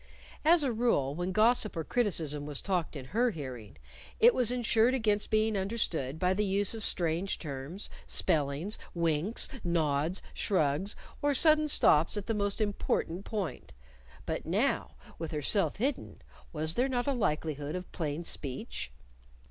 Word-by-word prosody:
As 325 Hz, 0 st, +5 dB
a 265 Hz, -, +1 dB
rule 220 Hz, -, +1 dB
when 175 Hz, +4 st, -3 dB
gossip 215 Hz, -1 st, +3 dB
or 165 Hz, -, -1 dB
criticism 155 Hz, -, +1 dB
was 145 Hz, -2 st, -1 dB
talked 180 Hz, -5 st, -1 dB
in 135 Hz, -3 st, -6 dB
her 245 Hz, +3 st, +3 dB
hearing, 130 Hz, -, -8 dB, 0.4 s
it 470 Hz, +1 st, +7 dB
was 245 Hz, -2 st, +4 dB
insured 240 Hz, 0 st, +2 dB
against 210 Hz, -4 st, +1 dB
being 215 Hz, 0 st, +2 dB
understood 190 Hz, -, -1 dB
by 180 Hz, +2 st, +2 dB
the 210 Hz, +2 st, 0 dB
use 200 Hz, +1 st, +1 dB
of 225 Hz, -, -6 dB
strange 175 Hz, 0 st, +1 dB
terms, 145 Hz, +5 st, -6 dB, 0.2 s
spellings, 150 Hz, +6 st, 0 dB, 0.2 s
winks, 170 Hz, +5 st, +1 dB, 0.2 s
nods, 160 Hz, 0 st, 0 dB
shrugs, 180 Hz, +1 st, 0 dB, 0.3 s
or 290 Hz, -1 st, +2 dB
sudden 310 Hz, +2 st, +5 dB
stops 165 Hz, -, +4 dB
at 205 Hz, -, -3 dB
the 225 Hz, -, -1 dB
most 205 Hz, -1 st, -1 dB
important 200 Hz, -3 st, -1 dB
point. 205 Hz, -6 st, -5 dB, 0.5 s
But -, -, -3 dB
now, -, -, 0 dB, 0.2 s
with 165 Hz, -1 st, -4 dB
herself 155 Hz, +7 st, +1 dB
hidden, 265 Hz, +5 st, -3 dB, 0.3 s
was 155 Hz, 0 st, -1 dB
there 255 Hz, +6 st, +1 dB
not 245 Hz, -2 st, -1 dB
a 280 Hz, -, +1 dB
likelihood 150 Hz, -, -2 dB
of 180 Hz, 0 st, -7 dB
plain 155 Hz, 0 st, -3 dB
speech? 135 Hz, -, -4 dB
190 Hz, 150 wpm, -30 LUFS, 155-225 Hz, 0.5 s, it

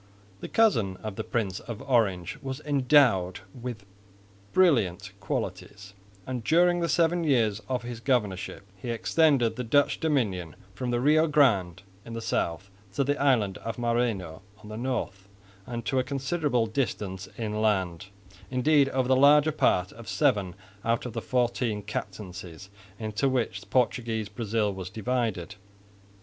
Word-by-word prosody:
This -, -, -7 dB
cousin 115 Hz, -, +2 dB
of 110 Hz, -2 st, -5 dB
the -, -, -3 dB
Prince 100 Hz, -6 st, -2 dB
of 115 Hz, -3 st, -7 dB
Orange 115 Hz, -3 st, +1 dB
was 135 Hz, 0 st, -5 dB
endowed 130 Hz, -11 st, +3 dB
with 120 Hz, -4 st, -7 dB, 0.7 s
brilliant 120 Hz, -, +2 dB
qualities, 100 Hz, -1 st, -5 dB, 0.3 s
and 125 Hz, -3 st, -4 dB
during 175 Hz, +5 st, +4 dB
the 170 Hz, -1 st, -1 dB
seven 170 Hz, 0 st, +2 dB
years 115 Hz, -8 st, +2 dB
of 125 Hz, -2 st, -1 dB
his 120 Hz, -1 st, -6 dB
governorship 105 Hz, -8 st, -1 dB
he 95 Hz, +6 st, -8 dB
extended 130 Hz, 0 st, +2 dB
the 125 Hz, -, -2 dB
Dutch 145 Hz, +5 st, +2 dB
dominion 105 Hz, -, -1 dB, 0.2 s
from 125 Hz, +6 st, -4 dB
the 120 Hz, 0 st, +1 dB
Rio 155 Hz, +5 st, +4 dB
Grande 110 Hz, -, +2 dB, 0.2 s
in 115 Hz, -, -9 dB
the 115 Hz, -, -4 dB
south 100 Hz, -3 st, -2 dB, 0.2 s
to -, -, +2 dB
the 145 Hz, +2 st, +1 dB
island 115 Hz, -9 st, +2 dB
of 115 Hz, -1 st, -5 dB
Maranhão 115 Hz, -9 st, -1 dB, 0.2 s
on 105 Hz, -, -11 dB
the 110 Hz, -, -6 dB
north 115 Hz, -5 st, -3 dB, 0.4 s
and 120 Hz, -1 st, -5 dB
to 130 Hz, -, +1 dB
a -, -, +1 dB
considerable 135 Hz, -2 st, 0 dB
distance 105 Hz, -5 st, -3 dB
inland, 105 Hz, -5 st, -1 dB, 0.4 s
indeed 135 Hz, +2 st, +3 dB
over 130 Hz, -2 st, 0 dB
the 130 Hz, -, +4 dB
larger 145 Hz, +3 st, +6 dB
part 90 Hz, -11 st, +2 dB
of 115 Hz, -1 st, -11 dB
seven 95 Hz, -4 st, +1 dB, 0.3 s
out 115 Hz, +1 st, 0 dB
of 125 Hz, -, -5 dB
the 115 Hz, -, -3 dB
fourteen 120 Hz, -4 st, 0 dB
captaincies 95 Hz, -2 st, -7 dB, 0.3 s
into 110 Hz, +4 st, -1 dB
which 115 Hz, -6 st, -2 dB
Portuguese 115 Hz, -4 st, 0 dB
Brazil 105 Hz, -1 st, -1 dB
was 95 Hz, -1 st, -6 dB
divided. 110 Hz, -3 st, -2 dB
115 Hz, 145 wpm, -27 LUFS, 100-135 Hz, 0.7 s, larger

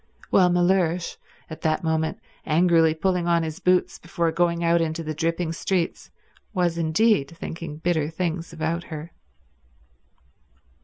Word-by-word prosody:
While 180 Hz, -2 st, +5 dB
Mellersh, 175 Hz, -1 st, +1 dB, 0.3 s
at 160 Hz, -, -9 dB
that 155 Hz, 0 st, 0 dB
moment 160 Hz, 0 st, 0 dB, 0.2 s
angrily 165 Hz, 0 st, +3 dB
pulling 180 Hz, +1 st, 0 dB
on 170 Hz, -1 st, +3 dB
his 155 Hz, -1 st, -5 dB
boots 180 Hz, 0 st, +1 dB
before 170 Hz, -1 st, -1 dB
going 170 Hz, 0 st, +1 dB
out 170 Hz, 0 st, +3 dB
into 165 Hz, 0 st, -2 dB
the 155 Hz, 0 st, -3 dB
dripping 165 Hz, +1 st, -1 dB
streets, 175 Hz, 0 st, -2 dB, 0.5 s
was 175 Hz, -2 st, +1 dB
indeed 165 Hz, -1 st, +2 dB
thinking 165 Hz, -2 st, -6 dB
bitter 160 Hz, -2 st, 0 dB
things 165 Hz, 0 st, -3 dB
about 165 Hz, +1 st, -2 dB
her. 155 Hz, +1 st, -7 dB
165 Hz, 135 wpm, -24 LUFS, 160-175 Hz, 0.5 s, While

